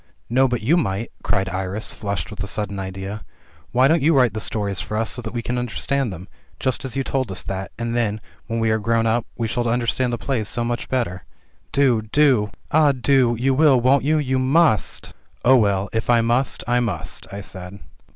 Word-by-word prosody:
"No, 130 Hz, +2 st, +4 dB
but 120 Hz, -3 st, -2 dB
you 155 Hz, +10 st, +4 dB
might," 110 Hz, -, -1 dB
cried 95 Hz, 0 st, 0 dB
Iris, 95 Hz, +3 st, -3 dB
flushed 100 Hz, -7 st, -4 dB
with -, -, -5 dB
a -, -, -5 dB
sudden 100 Hz, -2 st, -3 dB
idea. 95 Hz, +2 st, -5 dB, 0.5 s
"Why 130 Hz, +2 st, +4 dB
don't 160 Hz, +2 st, +3 dB
you 155 Hz, +1 st, +4 dB
write 125 Hz, -5 st, +4 dB
the 110 Hz, -, -3 dB
stories 100 Hz, -4 st, -2 dB
for 105 Hz, +4 st, -4 dB
us 115 Hz, 0 st, 0 dB
so 125 Hz, -, -2 dB
that 110 Hz, -2 st, -6 dB
we 120 Hz, -1 st, -4 dB
can 125 Hz, +1 st, -1 dB
understand 125 Hz, +1 st, -1 dB
them, 90 Hz, +1 st, -9 dB, 0.3 s
just 130 Hz, -2 st, -1 dB
as 130 Hz, -3 st, -4 dB
you 135 Hz, -, 0 dB
told 130 Hz, -5 st, -2 dB
us 95 Hz, -, -4 dB
that, 95 Hz, 0 st, -5 dB
and 115 Hz, 0 st, -2 dB
then, 110 Hz, -3 st, 0 dB, 0.3 s
when 115 Hz, 0 st, -2 dB
we 115 Hz, -1 st, +2 dB
are 110 Hz, -, +1 dB
grown 115 Hz, +1 st, +1 dB
up, 115 Hz, +1 st, +1 dB
we 115 Hz, -, -1 dB
shall 120 Hz, +2 st, -1 dB
understand 120 Hz, +1 st, 0 dB
the 120 Hz, -, -1 dB
plays 115 Hz, -4 st, -2 dB
so 120 Hz, -, -2 dB
much 120 Hz, +1 st, -3 dB
better. 115 Hz, -8 st, -2 dB, 0.5 s
Do! 130 Hz, -5 st, +3 dB
do 115 Hz, -1 st, +3 dB
!" -, -, -34 dB
"Ah, 150 Hz, -2 st, +5 dB
do! 125 Hz, -2 st, +2 dB
You 135 Hz, +2 st, +2 dB
will, 140 Hz, -2 st, +5 dB
won't 130 Hz, +3 st, +3 dB
you? 155 Hz, +3 st, +2 dB
You 130 Hz, -3 st, 0 dB
must!" 135 Hz, -, +2 dB, 0.3 s
*'0h, 130 Hz, +1 st, +7 dB
well, 100 Hz, -2 st, +1 dB
if 110 Hz, +1 st, -2 dB
I 120 Hz, -1 st, +5 dB
must, 120 Hz, +3 st, 0 dB
I 120 Hz, 0 st, +3 dB
must," 100 Hz, -11 st, -3 dB
I 100 Hz, +1 st, -6 dB
said. 95 Hz, -1 st, -9 dB
120 Hz, 220 wpm, -22 LUFS, 105-130 Hz, 0.5 s, 0h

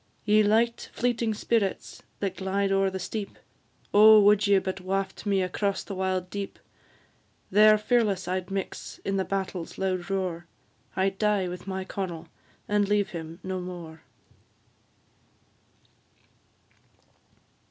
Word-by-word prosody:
Ye 210 Hz, 0 st, +5 dB
light 225 Hz, +3 st, +1 dB
fleeting 235 Hz, -2 st, 0 dB
spirits, 210 Hz, -2 st, -1 dB, 0.2 s
that 195 Hz, -2 st, -2 dB
glide 195 Hz, +1 st, 0 dB
o'er 195 Hz, 0 st, +3 dB
the 190 Hz, -, -5 dB
steep, 200 Hz, +2 st, -5 dB, 0.6 s
Oh, 215 Hz, +1 st, +9 dB
would 205 Hz, 0 st, +5 dB
ye 200 Hz, -1 st, +5 dB
but 190 Hz, 0 st, -3 dB
waft 190 Hz, +2 st, -3 dB
me 195 Hz, -2 st, +2 dB
across 200 Hz, +2 st, -1 dB
the 200 Hz, -, -7 dB
wild 185 Hz, -1 st, -2 dB
deep! 200 Hz, -1 st, -5 dB, 0.9 s
There 215 Hz, +2 st, +7 dB
fearless 210 Hz, -4 st, +1 dB
I'd 185 Hz, 0 st, -2 dB
mix 195 Hz, 0 st, -5 dB
in 195 Hz, 0 st, 0 dB
the 190 Hz, -, +1 dB
battle's 190 Hz, -3 st, -4 dB
loud 185 Hz, -1 st, -2 dB
roar, 180 Hz, -3 st, -2 dB, 0.5 s
I'd 190 Hz, 0 st, 0 dB
die 210 Hz, -3 st, +2 dB
with 180 Hz, +2 st, -7 dB
my 190 Hz, 0 st, -3 dB
Connel, 175 Hz, -4 st, -5 dB, 0.4 s
and 205 Hz, -1 st, +1 dB
leave 205 Hz, -1 st, +2 dB
him 165 Hz, 0 st, -7 dB
no 185 Hz, 0 st, -3 dB
more. 170 Hz, -3 st, -8 dB
195 Hz, 130 wpm, -27 LUFS, 185-205 Hz, 0.9 s, Oh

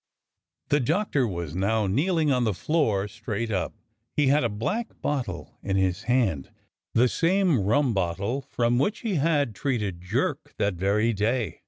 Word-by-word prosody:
The 145 Hz, -, +3 dB
Doctor 150 Hz, -, +1 dB
was 85 Hz, -5 st, -5 dB
now 105 Hz, +3 st, +1 dB
kneeling 155 Hz, -, +1 dB
on 125 Hz, -2 st, +2 dB
the 110 Hz, -5 st, 0 dB
floor 110 Hz, -, +1 dB
straight 110 Hz, +1 st, -4 dB
up. 95 Hz, -4 st, -2 dB, 0.4 s
He 145 Hz, -2 st, +3 dB
had 145 Hz, +1 st, +4 dB
a 120 Hz, -, +1 dB
black 210 Hz, -, -3 dB
bottle 125 Hz, -12 st, -3 dB
in 95 Hz, -1 st, -2 dB
his 95 Hz, 0 st, +1 dB
hand; 105 Hz, -, +1 dB, 0.5 s
the 125 Hz, +2 st, +5 dB
same 175 Hz, -, +2 dB
rum 115 Hz, +6 st, +2 dB
bottle 100 Hz, +7 st, -1 dB
from 120 Hz, -2 st, 0 dB
which 205 Hz, -, 0 dB
he 215 Hz, -7 st, -1 dB
had 145 Hz, -6 st, +2 dB
treated 105 Hz, -8 st, -2 dB
Jerk 90 Hz, -, -2 dB
that 100 Hz, -1 st, +1 dB
very 100 Hz, +6 st, +1 dB
day. 110 Hz, +3 st, -1 dB
115 Hz, 160 wpm, -26 LUFS, 100-145 Hz, 0.5 s, the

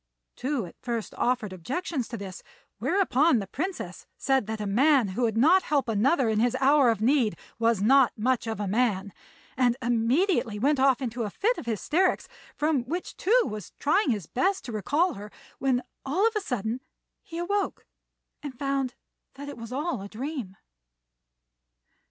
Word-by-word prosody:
Tou 265 Hz, -5 st, -2 dB
at 170 Hz, -, -12 dB
first 235 Hz, -3 st, -3 dB
offered 240 Hz, -6 st, 0 dB
objections 255 Hz, -, -3 dB
to 235 Hz, -, -6 dB
this; 195 Hz, -2 st, -8 dB, 0.4 s
whereupon 330 Hz, -7 st, +3 dB
the 205 Hz, -, -2 dB
Princess 340 Hz, -, -5 dB
said 265 Hz, -6 st, +1 dB
that 220 Hz, 0 st, -4 dB
a 210 Hz, -, -3 dB
man 255 Hz, +3 st, +3 dB
who 185 Hz, +7 st, -3 dB
would 225 Hz, -2 st, +1 dB
not 330 Hz, +10 st, +6 dB
help 285 Hz, -7 st, 0 dB
another 240 Hz, +5 st, +2 dB
in 220 Hz, -1 st, +1 dB
his 245 Hz, +2 st, +2 dB
hour 275 Hz, -1 st, +5 dB
of 225 Hz, -3 st, 0 dB
need 250 Hz, -3 st, +2 dB, 0.2 s
was 230 Hz, -3 st, +2 dB
not 265 Hz, +2 st, +5 dB
much 245 Hz, +2 st, 0 dB
of 220 Hz, -2 st, -3 dB
a 205 Hz, -, -2 dB
man, 205 Hz, -2 st, 0 dB, 0.4 s
and 245 Hz, -2 st, +2 dB
immediately 240 Hz, -, +1 dB
went 275 Hz, +6 st, +2 dB
off 270 Hz, 0 st, +3 dB
into 240 Hz, 0 st, -3 dB
a 215 Hz, -, -1 dB
fit 445 Hz, -, 0 dB
of -, -, -9 dB
hysterics, 305 Hz, -, +1 dB, 0.3 s
from 300 Hz, -3 st, +2 dB
which 345 Hz, +7 st, -4 dB
Tou 475 Hz, +5 st, +3 dB
was 210 Hz, -4 st, -6 dB
trying 310 Hz, +3 st, +2 dB
his 210 Hz, -8 st, -1 dB
best 380 Hz, -, 0 dB
to 245 Hz, -, -5 dB
recall 290 Hz, -, +1 dB
her, 205 Hz, +1 st, -9 dB, 0.3 s
when 255 Hz, -2 st, +1 dB, 0.2 s
all 335 Hz, +10 st, +1 dB
of 455 Hz, -, -2 dB
a 425 Hz, -, +1 dB
sudden 240 Hz, -, -3 dB, 0.4 s
he 330 Hz, -, -9 dB
awoke 400 Hz, +4 st, -2 dB, 0.6 s
and 280 Hz, -4 st, -7 dB
found 275 Hz, -2 st, -1 dB, 0.4 s
that 285 Hz, +1 st, -7 dB
it -, -, -7 dB
was 230 Hz, 0 st, -9 dB
all 280 Hz, -, -2 dB
a 200 Hz, -, -7 dB
dream. 245 Hz, -5 st, -5 dB
255 Hz, 175 wpm, -27 LUFS, 220-295 Hz, 0.6 s, not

